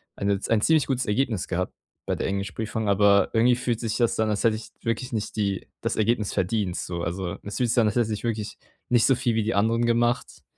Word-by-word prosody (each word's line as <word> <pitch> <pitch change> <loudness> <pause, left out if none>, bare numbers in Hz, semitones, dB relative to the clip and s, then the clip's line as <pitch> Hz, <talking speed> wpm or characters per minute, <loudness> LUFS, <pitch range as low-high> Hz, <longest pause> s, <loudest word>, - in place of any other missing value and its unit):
eine 100 -1 0
ein 115 -2 +3
ziemlich 155 +3 +3
gutes 130 -2 0
Ergebnis 110 -3 0
gehabt 90 0 -2 0.3
bei - - -1
der - - -2
Englischprüfung, 100 +3 -3
aber 100 0 +4
irgendwie 120 +2 +4
fühlt 120 -2 -2
sich 115 -3 -2
das 120 -2 +1
an, 110 -1 +2
als 105 -1 -1
hätte 115 -2 +3
ich 110 - -10
wirklich 115 +2 -2
nicht 110 -2 -3
die 100 -3 -1
das - - -1
Ergebnis 110 -1 +1
verdient 95 -1 -1
so. 85 -1 -4
Also, 90 +1 -3
es 100 - -5
fühlt 125 -2 +1
sich 120 - +3
an, 110 - +3
als 105 - -1
hätte 110 -2 +1
ich 105 - -5
wirklich 110 -3 -3 0.3
nicht 120 -2 +4
so 135 - +4
viel 120 -2 0
wie 110 - +1
die 110 +1 -1
anderen 115 +3 +2
gemacht, 120 +1 0
110 Hz, 235 wpm, -25 LUFS, 100-120 Hz, 0.3 s, aber